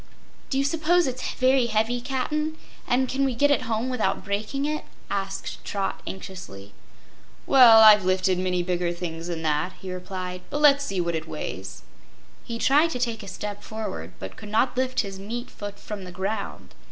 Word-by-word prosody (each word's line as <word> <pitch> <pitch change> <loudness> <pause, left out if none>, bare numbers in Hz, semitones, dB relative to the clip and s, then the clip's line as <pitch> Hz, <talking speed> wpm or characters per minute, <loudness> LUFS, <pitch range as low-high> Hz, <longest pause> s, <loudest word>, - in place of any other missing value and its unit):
"Do 270 - 0
you 275 - +2
'spose 330 +3 +3
it's 255 -1 -3
very 255 -1 +3
heavy, 225 +2 +1
Cap'n? 300 +5 -2 0.3
And 260 +1 +2
can 270 +2 0
we 265 -3 +1
get 290 +4 +3
it 280 - +1
home 225 +2 0
without 250 -6 -1
breaking 210 +8 -2
it?" 305 +1 -2 0.3
asked 195 -1 -3
Trot 195 -1 -3
anxiously. 140 - -8 0.7
"Well, 240 -5 +8
I've 210 -2 +9
lifted 185 0 +2
many 180 -1 0
bigger 175 -1 0
things 170 -1 -5
than 165 -2 -4
that," 155 +4 0
he 185 -1 -6
replied; 180 0 -5
"but 290 - -2
let's 285 -1 +6
see 195 -8 -2
what 170 -1 0
it 160 0 -3
weighs." 95 -11 -6 0.6
He 235 - -5
tried 290 +7 +4
to 250 - -3
take 235 -3 -1
a 200 - -10
step 205 +2 -5
forward, 205 - -6
but 95 0 -8
could 210 - -9
not 225 +4 +2
lift 255 0 +1
his 195 -2 -7
meat 235 +5 -5
foot 205 -1 -7
from 210 -2 -6
the 180 - -8
ground. 200 +3 -4
210 Hz, 185 wpm, -25 LUFS, 185-255 Hz, 0.7 s, I've